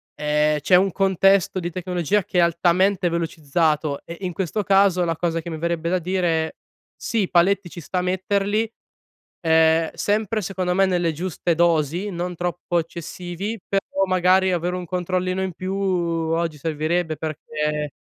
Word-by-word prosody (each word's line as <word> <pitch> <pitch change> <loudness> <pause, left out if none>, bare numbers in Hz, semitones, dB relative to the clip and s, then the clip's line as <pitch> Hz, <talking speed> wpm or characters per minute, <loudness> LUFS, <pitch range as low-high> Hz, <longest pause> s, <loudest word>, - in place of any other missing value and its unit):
ehm, 150 0 +1
c'è 180 - -1
un 190 +1 +4
contesto 195 0 +3
di 175 0 -3
tecnologia 180 +2 -1
che 185 -2 -1
è - - +6
altamente 175 +3 +2
velocizzato, 155 -2 0
eh, 170 0 -9
e 195 - -5
in 180 - -3
questo 195 +4 -2
caso 195 -2 +4
la 165 - -1
cosa 165 0 -1
che 170 - -7
mi 160 - -4
verrebbe 170 0 -1
da 185 +1 +1
dire: 170 -3 -1 0.4
"Sì, 220 -6 -1
paletti 185 +1 +2
ci 170 - -9
sta 180 +4 -2
metterli, 200 +4 0 0.8
ehm, 160 0 +4
sempre 215 +1 0
secondo 185 -1 -2
me 195 0 +4
nelle 175 -3 +1
giuste 170 +1 -2
dosi, 170 +3 +1
non 175 0 -4
troppo 175 0 -2
eccessivi. 175 +5 -6
Però 195 0 -1 0.2
magari 185 +1 +3
avere 175 +1 -1
un 180 -1 -6
controllino 185 +1 -1
in 190 - -2
più, 185 +3 -5
oggi 170 -4 -1
servirebbe, 160 +2 -1
perché 150 -1 -3
175 Hz, 155 wpm, -22 LUFS, 165-190 Hz, 0.8 s, è